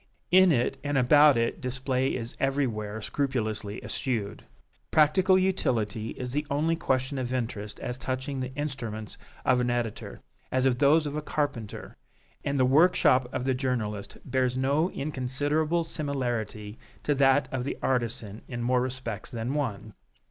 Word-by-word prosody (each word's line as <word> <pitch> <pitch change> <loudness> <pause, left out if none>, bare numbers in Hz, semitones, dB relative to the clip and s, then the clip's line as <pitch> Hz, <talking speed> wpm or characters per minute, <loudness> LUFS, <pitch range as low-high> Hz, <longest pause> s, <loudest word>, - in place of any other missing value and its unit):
In 185 0 +7
it 125 -4 +1
and 145 -1 0
about 145 +2 +6
it 115 0 0
display 130 +1 -1
is 120 -1 -5
everywhere 110 -6 -1
scrupulously 110 -7 -2
eschewed. 110 -6 -3 0.5
Practical 185 +5 +4
utility 120 - 0
is 125 -1 -4
the 150 +2 -2
only 155 +3 +1
question 130 -3 -1
of 125 -1 -3
interest 110 -5 -3
as 125 -1 -4
touching 130 +2 -3
the 130 0 -3
instruments 115 -8 -5 0.3
of 125 -1 +4
an 125 0 +1
editor, 120 -3 -3 0.3
as 130 0 +2
of 125 -2 +2
those 150 +2 +5
of 145 0 -3
a 150 - -1
carpenter; 145 -8 -3 0.5
and 140 -1 -1
the 130 - +5
workshop 140 -3 +4
of - - -2
the 135 - +2
journalist 120 -6 -2
bears 130 -1 0
no 140 +6 +2
inconsiderable 145 +4 -1
similarity 120 -9 -3 0.2
to 145 - +2
that 140 0 +4
of 130 -2 -2
the 140 - -3
artisan 120 -4 -1
in 120 -1 -4
more 125 +1 +2
respects 125 -4 -4
than 120 +1 -3
one. 110 -7 -3
130 Hz, 150 wpm, -28 LUFS, 120-145 Hz, 0.5 s, In